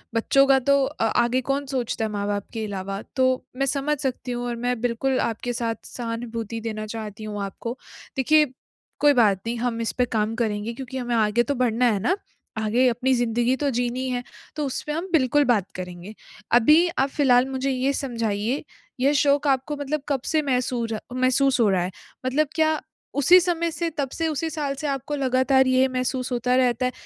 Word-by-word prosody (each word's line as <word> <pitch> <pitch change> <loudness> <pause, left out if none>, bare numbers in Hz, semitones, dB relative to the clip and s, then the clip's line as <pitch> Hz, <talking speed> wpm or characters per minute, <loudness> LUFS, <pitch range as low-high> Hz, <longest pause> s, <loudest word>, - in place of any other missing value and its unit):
बच्चों 275 +4 +4
का 270 -1 +5
तो 280 +2 +3
अ 265 -5 -1 0.2
आगे 245 +2 +1
कौन 280 +1 0
सोचता 250 -4 -2
है, 215 - -3
माँ-बाप 205 -1 -2
के 220 -1 -3
अलावा। 195 0 -4
तो 260 -1 +2
मैं 275 - +1
समझ 280 +2 0
सकती 255 -2 -3
हूँ 245 0 -3
और 240 - -2
मैं 245 -1 0
बिल्कुल 245 +2 0
आपके 235 +2 -2
साथ 230 -1 -1
सहानुभूति 230 -1 -5
देना 215 -1 -4
चाहती 215 -1 -7
हूँ 210 -1 -4
आपको। 230 +5 -5 0.4
देखिए, 300 +4 +5 0.5
कोई 290 0 +5
बात 210 -7 +3
नहीं 235 - -1
हम 235 -1 -2
इसपे 245 +2 0
काम 220 -2 -1
करेंगे, 220 -1 -2
क्योंकि 265 +1 -7
हमें 245 -2 -1
आगे 220 +2 +3
तो 285 - -2
बढ़ना 245 -1 +1
है 205 - 0
ना? 365 - +1 0.4
आगे 220 +4 +2
अपनी 250 +2 +1
ज़िंदगी 240 +1 +1
तो 285 +1 -1
जीनी 245 +2 -1
है, 245 -1 -2 0.3
तो 300 -2 -1
उसपे 275 +3 -4
हम 330 +5 -3
बिल्कुल 290 -2 +3
बात 215 -7 +1
करेंगे। 180 +2 -7 0.4
अभी 300 +9 +6
आप 270 +1 +2
फ़िलहाल 255 -3 +4
मुझे 265 +1 -2
ये 260 +2 0
समझाइए, 230 -2 -2 0.4
यह 275 +3 +3
शोक 285 0 +3
आपको 275 +2 +1
मतलब 290 +1 -2
कब 270 -3 0
से 315 -1 +1
महसूर 250 -4 -1 0.2
महसूस 255 +1 +2
हो 220 - +4
रहा 185 -2 +2
है? 180 - -2 0.3
मतलब 285 +4 +2
क्या 315 -1 +2 0.4
उसी 350 +7 +7
समय 340 -1 0
से, 335 +1 -2
तब 290 -4 -3
से 330 - -1
उसी 320 +1 -2
साल 295 -3 -2
से 295 +2 -4
आपको 275 +1 -2
लगातार 265 0 +3
ये 260 +1 +4
महसूस 255 0 -2
होता 250 +1 +1
रहता 255 -1 +2
है 250 - 0
255 Hz, 195 wpm, -24 LUFS, 230-275 Hz, 0.5 s, उसी